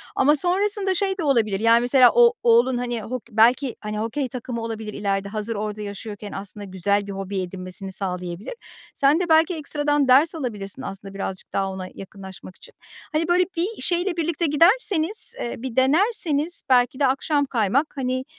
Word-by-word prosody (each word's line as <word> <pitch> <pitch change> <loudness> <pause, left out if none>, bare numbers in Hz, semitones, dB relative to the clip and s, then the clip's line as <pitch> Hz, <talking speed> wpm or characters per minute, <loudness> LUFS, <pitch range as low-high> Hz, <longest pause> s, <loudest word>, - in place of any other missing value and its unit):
Ama 295 +3 +4
sonrasında 385 +4 +1
şey 385 +1 -1
de 340 - -3
olabilir, 225 -8 +1
yani, 230 +2 +4
mesela 250 0 +5
o 475 -1 +5
oğlun, 240 +2 +4
hani, 240 -2 -3
hok 245 +2 -6
belki, 240 +4 +3
hani, 210 0 -5
hokey 245 +5 -2
takımı 240 -1 -6
olabilir 220 -2 -6
ileride. 200 -1 -2
Hazır 215 +1 -2
orada 210 0 -4
yaşıyorken 205 0 -7
aslında 200 +1 -5
güzel 200 +1 -1
bir 200 - -5
hobi 195 0 -4
edinmesini 185 +1 -7
sağlayabilir. 180 - -4 0.4
Sen 280 +4 +3
de 355 -2 -2
belki 320 +2 +4
ekstradan 290 -2 0
ders 285 +6 +5
alabilirsin 210 -9 -5
aslında 195 0 -7
birazcık 195 -1 -6
daha 195 0 0
ona 185 -1 -6
yakınlaşmak 190 -1 -11
için. - - -16 0.4
Hani, 315 +1 0
böyle, 355 +1 +3
bir 380 +7 -3
şeyle 350 0 0
birlikte 335 0 -1
giderseniz, 360 +6 +3
eee, 235 - -4
bir 255 -3 -6
denerseniz 315 - +1
belki 250 +1 +3
de 275 - +3
akşam 285 +2 0
kaymak, 255 +4 0
hani, 255 -1 -2
245 Hz, 170 wpm, -22 LUFS, 205-310 Hz, 0.4 s, mesela